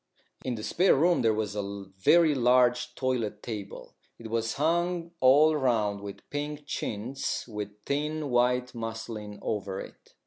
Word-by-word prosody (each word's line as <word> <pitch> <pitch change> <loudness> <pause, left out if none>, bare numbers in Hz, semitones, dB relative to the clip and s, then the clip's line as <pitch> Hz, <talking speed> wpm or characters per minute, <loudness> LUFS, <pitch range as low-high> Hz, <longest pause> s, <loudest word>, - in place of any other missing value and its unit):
In 125 -2 -2
the 110 - -7
spare 175 - +3
room 170 +5 +3
there 115 -2 +4
was 105 -1 -2
a 105 - -1 0.4
very 160 - +5
large 125 -1 +3
toilet 125 -5 -2
table. 105 -4 -7 0.2
It 115 -1 -9
was 115 0 0
hung 170 +2 0
all 145 +5 +6
round 110 -7 +1
with 100 -1 -9
pink 145 0 -4
chintz 120 -1 -3
with 105 -2 -7
thin 150 0 -2
white 125 +1 +2
muslin 110 -2 -6
over 100 -3 -2
it. - - -12
125 Hz, 145 wpm, -28 LUFS, 110-145 Hz, 0.4 s, all